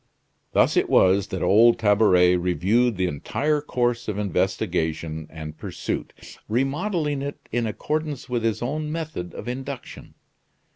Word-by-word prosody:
Thus - - +3
it - - +2
was 95 +2 +4
that 95 -3 -4
old 115 +4 +5
Tabaret 100 -4 +4
reviewed 95 +7 +1
the 95 - +1
entire 145 - -1
course 120 -4 -1
of 105 -2 -2
investigation 80 -5 -1
and 80 -1 -8
pursuit, - - -6
remodeling 145 - 0
it 140 +1 -4
in 120 0 0
accordance 150 +5 -3
with 120 -1 -1
his 115 0 0
own 150 +4 -2
method 155 - -5
of - - -7
induction. 130 +1 -7
115 Hz, 135 wpm, -24 LUFS, 90-140 Hz, -, old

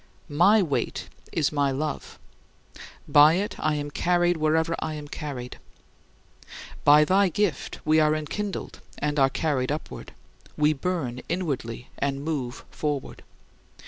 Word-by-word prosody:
My 195 +7 +5
weight 145 -6 -2 0.2
is 155 -4 +1
my 145 -2 +1
love. 145 +3 -4 0.9
By 150 +3 +7
it 205 +3 -2
I 155 0 +1
am 145 0 -4
carried 175 +2 +2
wherever 160 +1 +1
I 155 - -3
am 150 -1 -7
carried. 135 -5 -6 1.2
By 150 +1 +7
thy 190 +3 +3
gift, 190 -5 -1
we 155 +1 +4
are 155 0 +3
enkindled 190 +7 -4 0.2
and 150 0 -1
are 135 -1 +5
carried 135 -3 -1
upward. 150 - -6 0.4
We 150 +1 +3
burn 140 -6 -3
inwardly 135 -9 -3
and 140 0 -2
move 135 -7 -3
forward. 145 -3 -3
150 Hz, 130 wpm, -26 LUFS, 140-165 Hz, 1.2 s, By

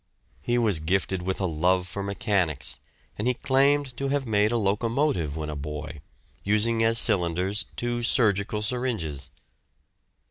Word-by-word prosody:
He 120 0 0
was 110 -8 +2
gifted 95 +3 -1
with 95 +1 -3
a 95 - 0
love 90 +2 +1
for 100 +3 -5
mechanics, 95 - -1 0.4
and 105 - -1
he 125 - +2
claimed 135 0 +2
to 140 - -2
have 140 0 -1
made 105 -1 +2
a 120 - +1
locomotive 105 - 0
when 75 -1 -4
a - - -6
boy, 75 +1 -6 0.4
using 110 +3 +2
as 115 0 +3
cylinders 90 +1 +2
two 120 0 -2
surgical 105 -3 +2
syringes. 105 - -2
100 Hz, 145 wpm, -26 LUFS, 85-120 Hz, 0.4 s, as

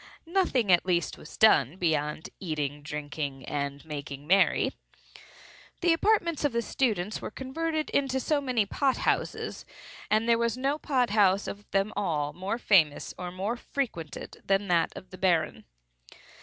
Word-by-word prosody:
Nothing, 325 - +1
at 175 - +5
least, 175 -2 0
was - - -12
done 160 - +5
beyond 155 -3 -1
eating 155 -6 -2
and 145 0 -15
drinking 145 -2 -5
and 140 -1 -3
making 145 -2 -6
merry. 190 +5 +3 1.1
The 345 -2 +4
apartments 340 -4 +1
of 290 -4 +1
the 235 0 0
students 215 -7 -1
were - - -4
converted 310 +6 -3
into 265 -2 +1
so 290 +3 +1
many 250 -6 +1
pot 265 +6 +1
houses, - - -1 0.5
and 215 +2 +2
there 230 0 +4
was 235 +1 0
no 275 +3 0
pot 255 -7 +1
house 200 -2 +4
of 205 0 -7
them 195 +2 0
all 150 -7 -1
more 190 +7 -3
famous 170 -11 +3
or 180 -1 -6
more 195 +6 -2
frequented 235 - -5
than 195 0 +1
that 170 -2 +3
of 185 - -11
the 185 - -10
Baron. 170 -4 +1
195 Hz, 155 wpm, -28 LUFS, 155-255 Hz, 1.1 s, at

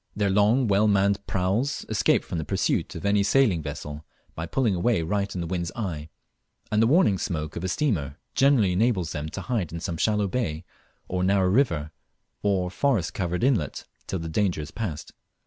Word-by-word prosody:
Their 100 -2 +1
long 105 +6 +3
well 105 +1 +3
manned 100 0 +3
praus 100 +10 0
escape - - +2
from 85 - -4
the - - -2
pursuit - - -1
of - - -6
any 100 0 +3
sailing 100 -4 +3
vessel 75 0 -6 0.3
by 80 +1 -5
pulling 120 +1 +1
away 90 0 +1
right 100 +4 -1
in 90 - -2
the - - -3
wind's 85 0 -3
eye, 80 -9 -4 0.6
and 105 0 +3
the 115 - +5
warning 135 - +4
smoke 75 -3 -3
of 85 - -4
a - - 0
steamer 90 - -1 0.2
generally 130 -8 +4
enables 95 -3 +1
them 75 +1 -4
to 95 - -6
hide 95 -4 -2
in 85 - -5
some 85 0 -4
shallow 105 +2 +1
bay, 90 -7 -2 0.4
or 90 0 -1
narrow 95 0 +3
river, 85 - +1 0.5
or 95 -3 0
forest 100 - 0
covered 90 +1 -2
inlet, 115 - +1 0.2
till 95 - -2
the 80 -1 -5
danger 90 0 0
is 75 +1 -8
passed. 80 -5 -5
95 Hz, 190 wpm, -26 LUFS, 80-105 Hz, 0.6 s, the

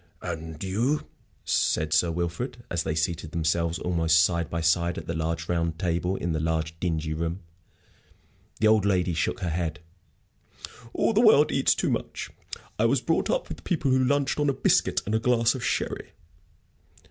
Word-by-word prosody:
"And 80 0 -6
you?" 115 +11 0 0.4
said 75 0 +1
Sir 85 - +3
Wilfrid, 85 +9 -3
as 85 - 0
they 80 - -2
seated 80 0 -2
themselves 85 +1 0
almost 80 -1 +3
side 85 -2 0
by 85 - -2
side 85 +1 +1
at - - -6
the 85 - -3
large, 80 0 -2
round 85 -1 -1
table 90 0 -1
in 85 -2 -2
the 80 - -1
large, 80 0 -1
dingy 80 -3 -1
room. 85 +4 -3 1.2
The 110 - +2
old 110 -2 +4
lady 90 -3 +1
shook 80 - -1
her 85 - -1
head. 85 0 -2 1.1
"All 230 - +1
the 220 - +4
world 185 -11 +6
eats - - +3
too - - 0
much. - - -4 0.5
I - - +3
was - - +3
brought - - 0
up - - 0
with - - -8
people 155 -7 0
who 130 0 +3
lunched 140 +2 +1
on 145 -1 +2
a - - +2
biscuit - - +2
and 105 - -2
a 110 - +3
glass 115 0 +3
of 130 - -6
sherry." - - -2
85 Hz, 180 wpm, -26 LUFS, 80-110 Hz, 1.2 s, world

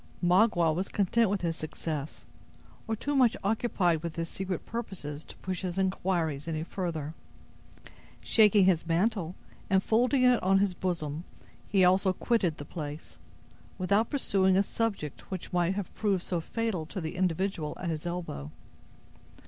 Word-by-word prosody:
Magua 175 -3 +4
was 185 +4 -2
content 210 +2 +2
with 195 -2 -1
his 165 -1 0
success, 155 -1 -5 0.6
or 225 - 0
too 285 +6 -2
much 255 -4 +4
occupied 195 -6 +1
with 170 -1 -5
his 165 0 -2
secret 190 -2 -4
purposes 175 -10 -5
to - - -12
push 185 -1 -4
his 185 -1 -3
inquiries 175 -6 0
any 160 -1 -2
further. 165 -4 -4 1.1
Shaking 210 -3 +5
his 170 -3 +2
mantle, 180 0 +1 0.3
and 190 0 +3
folding 250 +4 +3
it 250 -1 +5
on 190 +1 +4
his 195 -1 +2
bosom, 170 -4 -3 0.4
he 190 -2 +4
also 185 +1 +4
quitted 185 -6 +1
the 145 - -7
place, 145 - -7 0.6
without 200 +5 +2
pursuing 190 -9 +2
a 195 - +4
subject 200 -9 -3
which 185 -1 -6
might 175 +1 +2
have 200 -3 -4
proved 195 -4 0
so 175 -2 -1
fatal 210 -4 -2
to 190 - -5
the 160 -2 -4
individual 180 -3 -1
at 170 -2 -2
his 155 +1 -4
elbow. 165 - -4
185 Hz, 155 wpm, -29 LUFS, 165-200 Hz, 1.1 s, Shaking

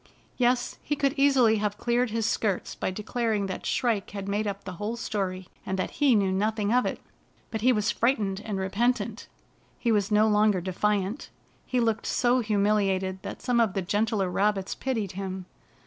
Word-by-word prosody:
Yes, 245 0 +1
he 295 - -1
could 275 -2 +1
easily 270 -6 +4
have 205 -1 -1
cleared 240 +2 +1
his 225 0 -1
skirts 205 -3 -1
by - - -2
declar 220 +4 -2
ing 200 -1 0
that 190 - -5
Shrike 230 -6 0
had 200 -1 -6
made 205 +2 -1
up 200 0 -4
the 190 - -6
whole 215 +3 -2
story, 190 -5 -3 0.2
and 190 - -3
that 185 - -2
he 275 -5 +5
knew 195 -2 +2
nothing 210 +2 0
of 250 0 +3
it. - - -3 0.5
But 220 - -3
he 255 +3 +5
was 215 -2 +1
frightened 210 -5 0
and 215 -3 -3
repentant. 205 +6 -1 0.5
He 235 - 0
was 205 -2 +2
no 215 +1 +4
longer 210 -2 +3
defiant. 195 +5 -1 0.4
He 250 - 0
looked 225 -2 0
so 250 +1 +2
humiliated 200 -3 +1
that - - -7
some 245 -2 +2
of 225 -5 +2
the 195 - -1
gentler 205 +1 0
rabbits 195 0 0
pitied 225 -8 -2
him. 190 -1 -5
210 Hz, 185 wpm, -27 LUFS, 195-235 Hz, 0.5 s, he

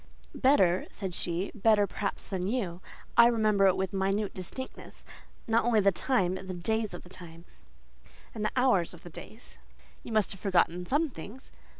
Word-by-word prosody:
"Better," 190 -10 +3
said 190 -3 -6
she, 175 +2 -2
"better, 215 -1 +3
perhaps, 200 +1 -4
than 185 -1 -3
you. 195 -7 -2 0.4
I 235 - +9
remember 215 -4 +3
it 190 - +3
with 190 0 -2
minute 195 +2 0
distinctness: 225 +8 -9 0.4
not 225 +1 +2
only 230 -2 +3
the 200 -1 +4
time, 185 -1 0
but 190 0 -7
the 185 - -4
days 220 +4 -1
of - - -10
the 180 - -15
time, 175 -2 -12 0.9
and 215 - -4
the 215 - +1
hours 245 -10 +2
of 170 - -17
the 175 - -10
days." 220 +8 -12 0.4
"You - - -9
must 215 -2 +2
have 195 - -7
forgotten 180 -2 +1
some 295 +2 +1
things?" 220 +7 -10
195 Hz, 180 wpm, -29 LUFS, 180-225 Hz, 0.9 s, I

